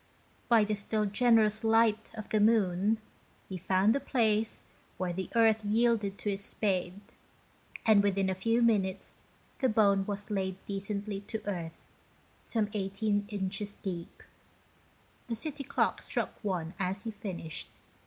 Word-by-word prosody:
By 230 -3 +6
the 210 +1 0
still 210 +1 -1
generous 220 0 +3
light 225 -1 +3
of 215 -2 -7
the 215 - +2
moon, 210 -1 +3 0.5
he 185 -2 -5
found 190 +5 +3
a - - +1
place 225 -5 +1 0.3
where 180 -2 -2
the 190 +1 -4
earth 220 -1 +4
yielded 215 -2 +2
to 205 - -2
his 195 0 -3
spade, 190 -3 -1 0.9
and 215 -3 +6
within 195 -1 +1
a 190 - +1
few 230 +5 +1
minutes 195 -4 +1 0.4
the 260 - +2
bone 200 -3 +3
was 205 +1 -4
laid 190 -2 -1
decently 200 0 -3
to 220 -1 -4
earth, 170 -5 -4 0.6
some 215 -3 -1
18 205 +1 -1
inches 200 0 -3
deep. 175 -3 -6 1.0
The 235 - -2
city 280 +4 -4
clocks - - 0
struck - - -1
one 180 -4 -2
as 190 +1 -2
he 225 - -3
finished. 185 -6 -5
205 Hz, 145 wpm, -31 LUFS, 195-220 Hz, 1.0 s, By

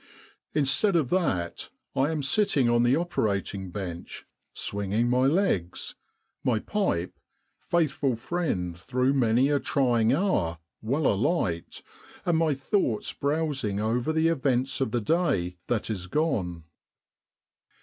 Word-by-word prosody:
Instead 155 +7 +3
of 150 -7 +1
that, 95 - -1 0.3
I 135 +3 +2
am 155 -3 -2
sitting 140 - +2
on 120 0 +3
the 120 +2 +4
operating 100 - -1
bench 90 -3 -6 0.3
swinging 100 +4 -1
my 130 +1 +3
legs, 140 - 0 0.5
my 120 -3 +2
pipe 110 - -2 0.4
faithful 150 -6 0
friend 110 - -2
through 130 +8 0
many 125 0 +3
a 145 -1 +2
trying 120 -6 +2
hour 130 - +1 0.2
well 135 +7 -1
alight, 100 - 0 0.4
and 170 -2 +2
my 160 -3 +2
thoughts 135 - -1
browsing 140 -8 -1
over 120 +7 0
the 160 +1 +2
events 135 -4 0
of 130 - +1
the 120 +1 -1
day 105 - 0
that 115 -2 -1
is 90 -4 -4
gone. 95 - -1
130 Hz, 125 wpm, -27 LUFS, 100-155 Hz, 0.5 s, the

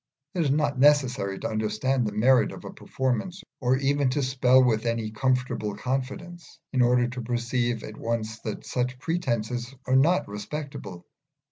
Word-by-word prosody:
It 180 - 0
is 150 - +1
not 145 -1 +1
necessary 130 -9 +3
to - - -3
understand 110 +3 0
the - - -3
merit 125 +4 +4
of - - -10
a - - -7
performance, 170 +9 -2 0.2
or 130 0 +2
even 140 0 +1
to 140 +2 0
spell 130 0 +4
with 115 -2 +1
any 115 -2 -1
comfortable 125 -3 -1
confidence, 135 +9 -4 0.2
in 130 - +3
order 120 0 +4
to 125 +1 -5
perceive 120 0 -1
at 110 - -8
once 110 -1 -3
that 110 -2 -6
such 125 0 -2
pretences 125 -6 -2
are 130 - +2
not 160 +7 +4
respectable. 105 - -7
125 Hz, 160 wpm, -26 LUFS, 115-135 Hz, 0.2 s, merit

